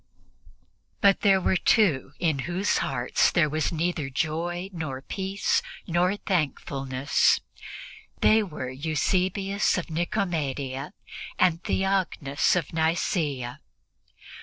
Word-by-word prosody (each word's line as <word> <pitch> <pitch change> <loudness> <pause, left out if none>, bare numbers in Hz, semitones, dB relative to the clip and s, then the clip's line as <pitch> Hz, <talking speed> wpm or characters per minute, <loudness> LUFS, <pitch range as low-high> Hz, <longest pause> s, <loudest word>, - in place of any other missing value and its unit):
But 200 -1 +4
there 195 -2 +5
were 185 - +1
two 165 - +2
in 160 -5 0
whose 185 +4 +1
hearts - - +1
there 170 -4 +3
was 155 0 0
neither 165 -3 -1
joy 170 +6 -2
nor 140 -6 -5
peace 195 +1 -1 0.2
nor 180 +3 +1
thankfulness; 140 -7 +1 0.8
they 220 +1 +5
were 150 -10 -5
Eusebius 185 +9 0
of 175 -2 -4
Nicomedia 150 -4 -2 0.4
and 180 -1 +2
Theognis 185 -8 +1
of 170 -3 -2
Nicea. 160 - -1
165 Hz, 100 wpm, -26 LUFS, 145-190 Hz, 0.8 s, there